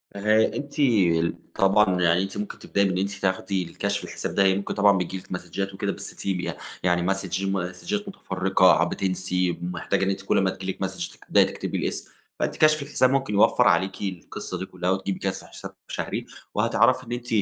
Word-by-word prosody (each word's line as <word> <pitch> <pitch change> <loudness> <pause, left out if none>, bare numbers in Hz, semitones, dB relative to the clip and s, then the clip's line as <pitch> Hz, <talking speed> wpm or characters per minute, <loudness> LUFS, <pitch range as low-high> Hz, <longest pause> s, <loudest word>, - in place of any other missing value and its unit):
أه 110 +2 +4
أنتِ 145 0 -6 0.8
طبعًا 95 -2 +3
يعني 90 +2 +3
أنتِ 95 - -6
ممكن 105 0 -5
تبدئي 100 - 0
إن 95 -2 +1
أنتِ 100 +1 0
تاخدي 95 0 -1
الكشف 85 - -3
الحساب - - -5
ده، 100 - +4
يعني 95 0 +4
ممكن 100 - -3
طبعًا 100 -1 +4
بيجِي 90 +1 -2
لكِ 95 - -12
مسدچات 95 +2 -4
وكده، - - -2
بس - - -9
تيجي 95 -2 -2 0.3
يعني 90 -1 +2
مسدچ 95 -1 -4
مسدچات 95 - -2
مُتفرقة، 95 - +3
بتنسي 90 -1 -1
ومحتاجة 90 +2 -2
إن 95 - +2
أنتِ 95 0 -2
كل 100 - +1
أما 95 -1 +3
تيجِي 95 0 -4
لكِ 95 - -12
مسدچ 95 -2 -6
تبدئي - - +5
تكتبي - - -4
الاسم. - - -3 0.3
فأنتِ - - -1
كشف 155 -1 +4
الحساب 140 -2 +2
ممكن 135 -4 0
يوفّر 100 - +5
عليكِ 95 +3 +2
القصة 95 -4 -5
دي 95 - -3
كلها، 90 -1 -3
وتجيبي 95 0 -2
كشف 95 -1 -3
حساب - - -10
شهري، - - -4 0.3
وهتعرفي 130 - +3
إن 120 - -10
أنتِ 120 0 -4
95 Hz, 185 wpm, -25 LUFS, 90-100 Hz, 0.8 s, تبدئي